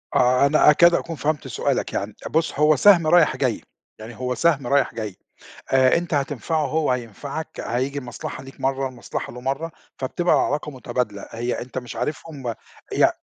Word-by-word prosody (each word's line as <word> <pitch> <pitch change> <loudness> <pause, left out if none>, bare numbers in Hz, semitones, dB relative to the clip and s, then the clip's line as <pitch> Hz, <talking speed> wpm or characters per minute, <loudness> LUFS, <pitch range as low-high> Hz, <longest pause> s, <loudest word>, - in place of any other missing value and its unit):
آه، 125 +2 +4
أنا 150 +1 +5
أكاد 170 +3 +6
أكون 170 -1 -1
فهمت 150 -1 -2
سؤالك - - -1
يعني. - - -3
بُص، 160 -3 0
هو 150 +1 +5
سَهْم 170 +1 +6
رايح 165 -1 +5
جاي. - - 0 0.4
يعني 110 +2 -9
هو 125 +1 -2
سَهْم 145 -6 +2
رايح 140 +2 +2
جاي، 105 -4 -5 0.6
آآ 130 -1 +5
أنت 170 -1 -3
هتنفعه 145 +2 -1
هو 155 +1 0
هينفعك، 125 +5 -4
هييجي 130 +4 -2
المصلحة 125 0 -7
ليك 135 - -13
مرّة 135 0 0
المصلحة 125 -2 -6
له 125 - -9
مرّة، 135 +6 -2 0.3
فبتبقى 170 +7 +1
علاقة 150 +1 -2
مُتبادلة. 125 -6 -4
هي 120 +2 -3
أنت 130 +1 -6
مش 125 -2 -7
عارفهم 135 -1 -4 0.4
ي - - +5
135 Hz, 170 wpm, -23 LUFS, 125-155 Hz, 0.6 s, أكاد